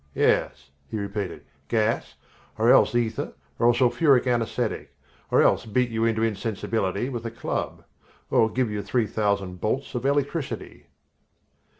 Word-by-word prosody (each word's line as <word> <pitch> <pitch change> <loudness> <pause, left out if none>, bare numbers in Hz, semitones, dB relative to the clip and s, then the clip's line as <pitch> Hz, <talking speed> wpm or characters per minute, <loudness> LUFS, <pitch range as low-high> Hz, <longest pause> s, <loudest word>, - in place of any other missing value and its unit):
"Yes," 70 0 +1 0.2
he - - -3
repeated, 100 -2 -4 0.2
"gas, 110 -1 0 0.4
or - - +4
else - - +5
ether 115 -2 -1 0.3
or 120 - +5
a - - +5
sulphuric 125 +2 +4
anesthetic, 120 -3 -1 0.3
or - - +4
else - - +2
beat 125 +2 +1
you 115 0 0
into 115 -1 +1
insensibility 110 -1 -1
with 120 -4 -5
a 115 - -3
club, 115 +1 -4 0.5
or 110 - +4
give 125 -2 -1
you 105 -1 -2
three 110 +4 0
thousand 100 -4 -1
bolts 130 +6 -1
of 125 -1 -3
electricity." 140 +1 -2
115 Hz, 140 wpm, -25 LUFS, 105-125 Hz, 0.5 s, else